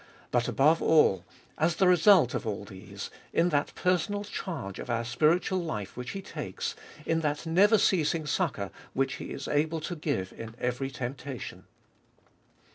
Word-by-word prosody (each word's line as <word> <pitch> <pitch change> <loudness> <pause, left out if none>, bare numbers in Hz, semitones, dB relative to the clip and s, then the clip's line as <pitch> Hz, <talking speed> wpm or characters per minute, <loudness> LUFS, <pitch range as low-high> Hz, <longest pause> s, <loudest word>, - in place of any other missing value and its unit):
But 120 -1 +2
above 155 +4 +3
all, 95 - +4 0.3
as 160 +2 +2
the 190 - +3
result 180 - +6
of 120 - -3
all 100 -1 -3
these, 95 0 -9 0.2
in 170 +2 +3
that 145 -2 0
personal 185 +3 0
charge 165 - -5
of - - -7
our 115 0 0
spiritual 155 +10 +2
life 105 - -4
which 125 0 -6
He 195 - -5
takes, - - -4 0.3
in 165 0 +1
that 150 -1 -2
never 200 +7 +5
ceasing 165 -5 +2
succour 145 - -1 0.2
which 135 0 0
He - - -7
is 140 - -6
able 155 +2 +1
to 175 +3 -4
give 145 - -2
in 115 0 -9
every 125 +2 -1
temptation. 130 -1 -6
150 Hz, 160 wpm, -29 LUFS, 120-170 Hz, 0.3 s, result